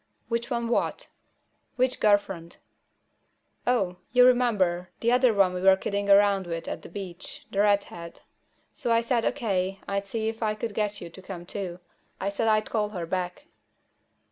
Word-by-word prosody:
"Which 235 0 -1
one 235 -1 -1
what?" 235 - -1 0.7
"Which 255 0 +1
girl 210 -1 +6
friend?" 175 -4 -9 1.1
"Oh. 195 -8 +1
You 250 +1 +7
remember, 205 -9 +2
the 235 - +2
other 250 0 +5
one 195 -3 +3
we 180 - -3
were 190 0 +7
kidding 200 +1 -2
around 200 -2 +5
with 165 -1 -4
at - - -4
the - - -11
beach, 185 -1 -8
the 195 - -2
redhead. 200 -5 0 0.5
So 235 - -2
I 230 0 +4
said, 235 0 0
O.K., 195 -7 -1
I'd 200 0 -2
see 220 +2 -2
if 225 +1 -4
I 215 -1 +1
could 215 0 -4
get 210 0 -2
you 170 - -8
to 190 - -10
come 185 -2 -8
too. 180 -2 -5 0.4
I 200 +1 -1
said 225 +3 -1
I'd 215 -1 +2
call 210 -2 0
her 180 -5 -4
back." 180 - -3
200 Hz, 175 wpm, -27 LUFS, 185-230 Hz, 1.1 s, You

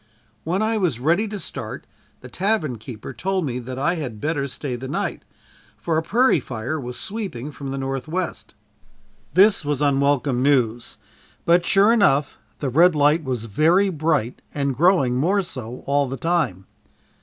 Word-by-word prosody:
When 185 +6 0
I 220 0 +1
was 165 - 0
ready 170 - +2
to 210 0 -5
start, - - -6 0.4
the - - -10
tavern 180 - -1
keeper 115 +3 -8
told 185 +7 -1
me 125 -2 -3
that 125 +1 -7
I 140 +5 +1
had 125 -9 -5
better 145 +1 -1
stay 130 0 -5
the 130 +2 -6
night, 180 +9 -3 0.6
for 165 - -2
a 160 - +2
prairie 230 +3 +3
fire 125 +5 -4
was 125 -2 -6
sweeping 185 - -5
from 140 -1 -7
the 135 - -3
northwest. 135 +7 -4 0.8
This 195 0 +5
was 145 -1 -1
unwelcome 140 -2 +2
news 125 -4 +1 0.5
but 170 +1 +3
sure 200 +3 +5
enough, 150 - +2 0.2
the 140 - -2
red 165 +6 +5
light 150 +2 +3
was 125 -5 -3
very 165 - +3
bright 155 - -1
and 140 -2 -1
growing 150 -6 +3
more 190 +9 +2
so 125 -7 -8
all 140 -1 +1
the 135 - -4
time. 150 - -1
145 Hz, 165 wpm, -22 LUFS, 130-175 Hz, 0.8 s, This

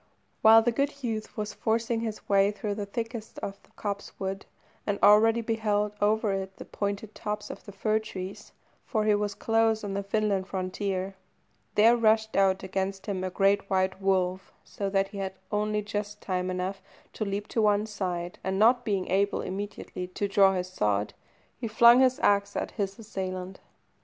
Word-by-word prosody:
While 225 +1 +8
the 240 - +2
good 280 +3 -2
youth 220 -3 -4
was 210 0 -3
forcing 225 +1 0
his 220 -2 -5
way 200 0 +4
through 205 0 -3
the 200 -1 -4
thickest 225 +1 -5
of 195 0 -5
the - - -26
copsewood, 200 -1 -5 0.4
and 205 -1 0
already 225 +3 +6
beheld 215 -2 0
over 210 0 +2
it 190 0 -4
the - - -9
pointed 205 +1 -4
tops 210 0 -4
of - - -10
the 200 - -9
fir 215 +2 +1
trees 190 -3 -7 0.3
(for 215 -3 -1
he 215 - +4
was 205 -1 -1
close 225 -1 +2
on 200 -1 -3
the 200 - -1
Finland 200 -1 0
frontier), 190 0 -3 0.6
there 225 +3 +6
rushed 220 -1 +2
out 190 -1 +3
against 190 +1 -3
him 190 -2 -3
a 185 - -1
great 195 +1 +2
white 190 0 0
wolf, 190 -1 0
so 200 -1 -4
that 195 0 +1
he 200 - -7
had 190 -1 -3 0.2
only 210 0 0
just 210 0 -4
time 185 -1 -2
enough 185 +2 -3 0.3
to - - -3
leap 205 0 -3
to 225 - 0
one 210 0 +3
side, 180 -5 -4
and 190 +1 -1
not 240 +4 +5
being 195 -5 -1
able 200 +2 +1
immediately 195 -1 -5
to 195 +3 -3
draw 195 -1 +4
his 180 0 -2
sword, 105 - 0 0.5
he 235 - -3
flung 235 +3 +7
his 260 +1 +4
axe 200 0 +3
at - - -2
his 195 -1 -3
assailant. 190 -3 -5
205 Hz, 180 wpm, -28 LUFS, 190-215 Hz, 0.6 s, While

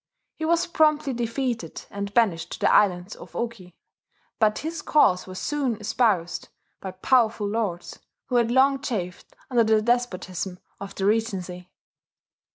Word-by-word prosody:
He 315 - -5
was 335 +1 +2
promptly 305 -4 +2
defeated, 235 - -3
and 200 0 -4
banished 200 -7 +1
to - - -7
the - - +3
islands 185 -1 +2
of - - -13
Oki; 215 -7 -5 0.6
but 215 -1 +3
his 320 +1 -4
cause 185 -13 +3
was 185 0 -8
soon 275 -3 -1
espoused 210 -6 0 0.3
by 190 - -5
powerful 215 +2 +2
lords, 200 -5 -3 0.3
who 250 - 0
had 235 -1 +2
long 270 +2 +3
chafed 180 -9 -5 0.2
under 240 -2 +4
the 220 0 +3
despotism 195 -6 -1 0.2
of 200 0 -8
the 195 - -2
regency. 190 -5 -1
220 Hz, 145 wpm, -25 LUFS, 185-245 Hz, 0.6 s, under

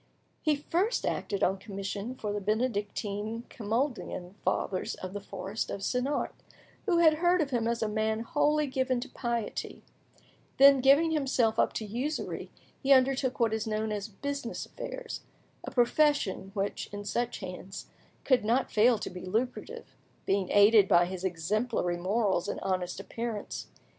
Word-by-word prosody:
He 305 -2 +2
first 355 +10 0
acted 200 -2 -1
on 190 +1 +2
commission 200 +4 -5
for 210 -4 -3
the 205 - -2
Benedictine 210 0 -2
Camalduian 225 -5 -2
fathers 185 - -1
of 185 0 -7
the 205 - -4
forest 200 +1 -4
of 200 - -4
Senart, 260 +6 -1 0.5
who 355 -4 +3
had 315 -2 +5
heard 355 +1 +4
of 295 -4 0
him 235 -3 +1
as 235 -1 0
a - - +1
man 220 +1 0
wholly 300 +3 +2
given 260 -2 0
to 265 - -6
piety; 235 -3 -3 0.7
then, 275 -1 +8
giving 285 +5 +5
himself 260 -7 +1
up - - +3
to 220 - -3
usury, 250 +9 -3 0.3
he 275 - +1
undertook 260 0 +4
what 230 -2 +2
is 220 0 -2
known 215 0 -1
as 205 0 -3
"business 280 +3 -4
affairs," - - -6 0.4
a - - -5
profession 245 -6 +2
which, 200 0 -2
in 205 0 -6
such 240 +3 -1
hands, 185 0 -7 0.4
could 255 -5 +3
not 240 +5 +1
fail 230 +2 +5
to - - -5
be 180 - -8
lucrative, 225 +7 -3 0.3
being 195 -1 +1
aided 205 0 +7
by 175 -1 +5
his 185 0 -6
exemplary 185 +2 0
morals 190 0 +1
and - - -3
honest 185 -1 -2
appearance. 225 +1 -5
225 Hz, 155 wpm, -30 LUFS, 200-265 Hz, 0.7 s, then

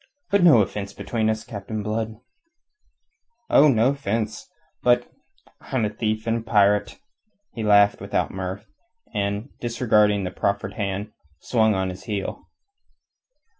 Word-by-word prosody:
"But 200 -1 +4
no 150 -11 +7
offence 100 +1 -6
between 110 -2 -1
us, 110 0 -2
Captain 105 0 -6
Blood!" 110 +1 -3 1.4
"Oh, 150 - +7
no 120 -2 +4
offence. 110 -5 -3 0.3
But... 120 0 +3 0.5
I'm 125 -5 -1
a 105 - -2
thief 110 0 -2
and 115 0 +1
a - - -4
pirate." 105 -2 +2 0.6
He 115 - -5
laughed 100 -1 +4
without - - -1
mirth, 95 +2 -5 0.5
and, 100 +3 -2
disregarding 105 -4 +2
the 90 - -3
proffered 100 +1 -2
hand, 100 +1 -3 0.3
swung 110 0 +2
on 95 0 -1
his 90 +6 -11
heel. 105 -4 -5
105 Hz, 130 wpm, -23 LUFS, 100-115 Hz, 1.4 s, no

